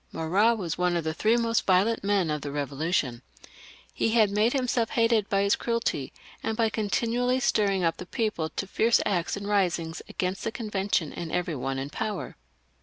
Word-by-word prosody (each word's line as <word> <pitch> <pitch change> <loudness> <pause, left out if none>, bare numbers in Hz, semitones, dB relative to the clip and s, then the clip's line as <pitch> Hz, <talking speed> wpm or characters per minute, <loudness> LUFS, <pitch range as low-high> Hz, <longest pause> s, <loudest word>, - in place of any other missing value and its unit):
Marat 195 +9 +2
was 175 -4 -4
one 180 -1 +2
of 170 - -2
the 160 0 -2
three 220 +8 +2
most 230 -1 0
violent 195 +5 +3
men 200 -5 +1
of 150 -1 -2
the 145 - -5
Eevolution. 140 -2 -1 0.7
He 225 - 0
had 215 -4 +4
made 210 +3 +2
himself 250 -4 0
hated 230 -3 +2
by 195 0 +2
his 200 - +3
cruelty, 230 - -2 0.3
and 225 -1 -2
by 225 -2 +3
continually 235 +4 0
stirring 200 -6 +1
up 165 -1 +1
the 180 - -8
people 210 -9 -1
to 195 - -4
fierce 225 +4 +3
acts 180 -2 0
and 200 0 -6
risings 175 -5 0
against 185 +1 -3
the 225 - -1
Convention 200 - -1
and 165 -2 -6
every 175 -3 -1
one 135 0 -3
in 135 +2 -4
power. 205 +2 -4
200 Hz, 185 wpm, -27 LUFS, 165-225 Hz, 0.7 s, had